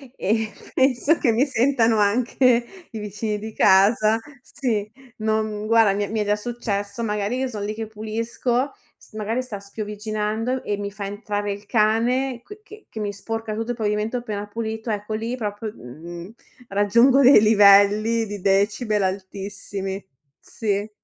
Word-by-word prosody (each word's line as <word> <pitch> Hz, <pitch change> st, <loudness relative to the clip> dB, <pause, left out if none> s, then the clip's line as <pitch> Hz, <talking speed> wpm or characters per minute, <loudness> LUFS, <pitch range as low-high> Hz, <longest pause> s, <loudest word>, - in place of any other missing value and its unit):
e 220 Hz, +2 st, 0 dB, 0.2 s
penso 265 Hz, +4 st, +3 dB
che 240 Hz, -, +2 dB
mi 245 Hz, +6 st, +3 dB
sentano 240 Hz, -3 st, +2 dB
anche 235 Hz, +3 st, +3 dB, 0.3 s
i 220 Hz, -, -6 dB
vicini 210 Hz, +1 st, -3 dB
di 220 Hz, +1 st, -7 dB
casa. 215 Hz, +3 st, +4 dB, 0.2 s
Sì, 220 Hz, -7 st, -2 dB, 0.3 s
non 215 Hz, -1 st, -1 dB
guarda 225 Hz, -3 st, +5 dB
mi 205 Hz, +1 st, -1 dB
è -, -, -4 dB
mi 220 Hz, -, -1 dB
è 210 Hz, -, 0 dB
già 205 Hz, 0 st, +2 dB
successo, 210 Hz, -1 st, -4 dB
magari 210 Hz, +2 st, -1 dB
io 265 Hz, 0 st, -1 dB
son 210 Hz, -4 st, -5 dB
lì 210 Hz, +1 st, -3 dB
che 220 Hz, 0 st, -5 dB
pulisco, 230 Hz, +5 st, -2 dB, 0.3 s
s -, -, -21 dB
magari 220 Hz, +4 st, -2 dB
sta 220 Hz, -6 st, -7 dB
spiovviginando 215 Hz, +4 st, -3 dB
e 205 Hz, -, -1 dB
mi 200 Hz, 0 st, -4 dB
fa 200 Hz, -1 st, -6 dB
entrare 205 Hz, 0 st, -3 dB
il 205 Hz, +1 st, -11 dB
cane 235 Hz, +4 st, +1 dB
qui 415 Hz, +1 st, -12 dB
che 425 Hz, 0 st, -14 dB
che 220 Hz, -, -8 dB
mi 205 Hz, -1 st, -2 dB
sporca 225 Hz, +2 st, -5 dB
tutto 225 Hz, +2 st, -3 dB
il 240 Hz, -, -5 dB
pavimento 215 Hz, +2 st, -1 dB
appena 210 Hz, -4 st, -4 dB
pulito, 220 Hz, +1 st, -5 dB
ecco 210 Hz, 0 st, -3 dB
lì 230 Hz, +3 st, -3 dB
proprio, 210 Hz, -1 st, -4 dB
mhmm, 170 Hz, -, -10 dB, 0.4 s
raggiungo 235 Hz, +7 st, +4 dB
dei 265 Hz, -2 st, +8 dB
livelli 210 Hz, +2 st, +5 dB
di 205 Hz, -2 st, -7 dB
decibel 200 Hz, +2 st, +1 dB
altissimi. 195 Hz, 0 st, -4 dB, 0.4 s
Sì. 205 Hz, -1 st, -3 dB
215 Hz, 160 wpm, -23 LUFS, 205-230 Hz, 0.4 s, dei